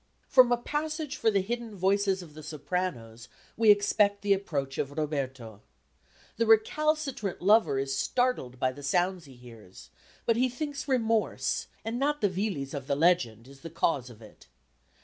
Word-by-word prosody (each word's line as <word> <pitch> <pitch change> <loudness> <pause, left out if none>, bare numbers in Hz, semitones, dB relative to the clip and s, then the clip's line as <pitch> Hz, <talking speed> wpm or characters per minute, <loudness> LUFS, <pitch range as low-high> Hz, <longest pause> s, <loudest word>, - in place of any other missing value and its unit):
From 255 -2 +6
a 245 - +4
passage 300 +3 -3
for 225 - +2
the 200 -3 +1
hidden 235 +1 -4
voices 195 0 +1
of 155 -4 -14
the 155 - -10
sopranos 150 -7 -4 0.3
we 225 -1 +3
expect 205 0 +3
the 200 -1 +4
approach 140 -9 -3
of 135 - -1
Roberto. 130 -8 -4 0.8
The 230 0 +1
recalcitrant 275 - +1
lover 185 -7 +4
is 135 0 -1
startled 190 - -1
by 130 0 +1
the 140 +3 -11
sounds 175 +4 0
he 135 -2 -14
hears, 115 -6 -14 0.3
but 230 -1 +2
he 255 +1 +2
thinks 290 +3 -5
remorse, 230 -4 0 0.2
and 230 +2 -3
not 295 +2 0
the 205 - +2
Villis 185 -8 -3
of 140 -2 -6
the 140 - +1
legend, 130 -8 +1
is 135 0 -15
the 165 - -8
cause 145 -5 -1
of 115 -2 -14
it. 105 -11 -16
185 Hz, 170 wpm, -28 LUFS, 135-230 Hz, 0.8 s, From